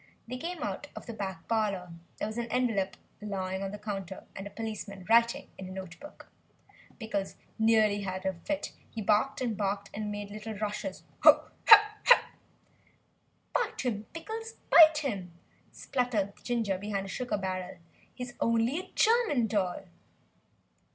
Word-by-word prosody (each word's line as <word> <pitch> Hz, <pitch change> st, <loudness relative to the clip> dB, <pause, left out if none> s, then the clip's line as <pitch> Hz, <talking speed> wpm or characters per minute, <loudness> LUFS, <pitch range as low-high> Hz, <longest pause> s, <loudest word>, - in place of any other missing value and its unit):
They 250 Hz, +2 st, -5 dB
came 335 Hz, +1 st, -4 dB
out 290 Hz, -, -4 dB
of -, -, -8 dB
the 235 Hz, -, -6 dB
back 190 Hz, -6 st, -5 dB
parlour. 200 Hz, -6 st, -1 dB, 0.2 s
There -, -, -2 dB
was 220 Hz, +2 st, -4 dB
an 235 Hz, -, -2 dB
envelope 225 Hz, -7 st, 0 dB, 0.2 s
lying 190 Hz, -2 st, -3 dB
on 195 Hz, -, -2 dB
the 205 Hz, -, -6 dB
counter, 195 Hz, -3 st, -5 dB
and 195 Hz, +1 st, -6 dB
a -, -, -8 dB
policeman 205 Hz, -3 st, -6 dB
writing 235 Hz, +1 st, +3 dB
in 190 Hz, -, -6 dB
a -, -, -8 dB
note 185 Hz, -3 st, -8 dB
book! 295 Hz, +1 st, -12 dB, 0.7 s
Pickles 205 Hz, -4 st, -3 dB, 0.2 s
nearly 220 Hz, -2 st, +4 dB
had 190 Hz, -1 st, -4 dB
a 190 Hz, -, +1 dB
fit, 290 Hz, -, -4 dB, 0.2 s
he 230 Hz, -, -7 dB
barked 215 Hz, +6 st, +2 dB
and 245 Hz, -2 st, 0 dB
he -, -, -3 dB
barked 200 Hz, 0 st, -2 dB
and 210 Hz, 0 st, -3 dB
made 205 Hz, 0 st, -5 dB
little 215 Hz, +1 st, -6 dB
rushes. 210 Hz, +7 st, -4 dB, 0.2 s
"Bite -, -, +8 dB, 2.4 s
him, 220 Hz, -5 st, -2 dB
Pickles! 450 Hz, +7 st, -6 dB, 0.2 s
bite 315 Hz, -2 st, +9 dB
him!" 195 Hz, -10 st, -3 dB, 0.4 s
spluttered 235 Hz, -6 st, -1 dB
Ginger 225 Hz, -6 st, 0 dB
behind 200 Hz, -1 st, -3 dB
a -, -, -7 dB
sugar 250 Hz, 0 st, -2 dB
barrel, 185 Hz, -2 st, -4 dB, 0.4 s
"he's 250 Hz, -1 st, -6 dB
only 230 Hz, +6 st, +2 dB
a 370 Hz, -, -10 dB
German 440 Hz, -, +3 dB
doll!" 195 Hz, -5 st, -1 dB
210 Hz, 150 wpm, -30 LUFS, 195-245 Hz, 2.4 s, bite